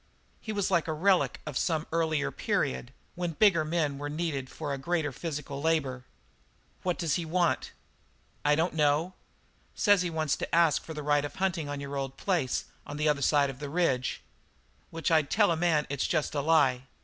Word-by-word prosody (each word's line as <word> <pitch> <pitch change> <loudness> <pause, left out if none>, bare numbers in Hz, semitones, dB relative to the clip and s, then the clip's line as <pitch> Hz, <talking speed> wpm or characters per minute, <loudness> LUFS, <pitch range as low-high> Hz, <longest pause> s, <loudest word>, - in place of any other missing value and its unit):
He 220 - -5
was 200 -2 -1
like 170 - +2
a 160 - -1
relic 185 +4 +2
of 150 -3 -6
some 160 -2 0
earlier 160 -3 0
period 65 -1 -1 0.2
when 175 -1 -3
bigger 180 -3 +4
men 155 -3 -1
were 145 0 -4
needed 150 -4 -3
for 150 -3 -4
a - - -2
greater 160 0 -1
physical 145 -1 -5
labour. 140 -6 0 0.8
"What 180 -2 -1
does 165 -5 0
he 175 - -3
want?" 170 +1 0 0.7
"I 150 0 +4
don't 165 +3 0
know. 155 +3 +2 0.6
Says 205 -3 +4
he 180 - -1
wants 155 -3 0
to - - -2
ask 165 -3 +4
for 160 - -8
the 150 - -5
right 145 0 +2
of 145 -1 -6
hunting 180 -6 -1
on 145 0 -4
your 140 0 -5
old 135 -1 -4
place 170 -10 0 0.2
on 145 - -7
the 150 +1 +1
other 145 -2 +2
side 140 0 +3
of 130 - -13
the 145 -1 -5
range. 140 -6 0 0.7
Which 165 0 -2
I'd 155 -3 +3
tell 205 -3 +3
a - - +2
man 160 -3 +2
it's 140 -1 -1
jest 155 -3 0
a 145 - 0
lie. 140 -5 +3
155 Hz, 195 wpm, -29 LUFS, 145-170 Hz, 0.8 s, bigger